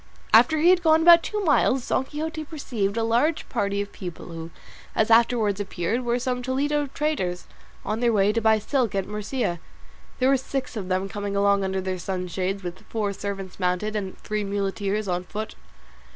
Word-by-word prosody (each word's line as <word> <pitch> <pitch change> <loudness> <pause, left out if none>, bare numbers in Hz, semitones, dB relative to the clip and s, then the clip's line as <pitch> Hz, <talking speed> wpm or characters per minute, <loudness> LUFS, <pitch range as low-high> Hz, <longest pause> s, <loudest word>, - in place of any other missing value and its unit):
After 315 -1 +6
he 335 +4 +5
had 365 -1 +3
gone 320 -1 +4
about 340 0 +9
two 420 +5 -3
miles 270 -4 +3
Don 260 - +1
Quixote 315 +2 -4
perceived 230 -9 -3
a 230 - +1
large 245 +8 +1
party 200 -3 0
of 205 - -13
people, 175 -3 -8
who, 165 -1 -7 0.5
as 220 +1 +2
afterwards 225 -3 +4
appeared, 205 +3 -2
were 240 -1 0
some 250 0 -2
Toledo 285 +3 0
traders, 265 -12 -2 0.4
on 215 +2 -1
their 240 -1 +3
way 205 -1 +3
to 230 - 0
buy 220 0 +4
silk 230 0 0
at 195 -1 0
Murcia. 210 -2 -2 0.6
There 260 +1 +3
were 275 - +5
six 265 0 -4
of 200 -4 -4
them 185 +1 0
coming 205 -1 -4
along 200 0 +3
under 190 0 -1
their 185 -1 -3
sunshades, 185 +1 -3
with 175 0 -6
four 210 -3 -1
servants 195 -2 -6
mounted, 180 +4 0
and 195 -3 -4
three 210 0 -3
muleteers 200 +1 -2
on 180 -1 -1
foot. 215 +4 -6
210 Hz, 185 wpm, -25 LUFS, 195-260 Hz, 0.6 s, about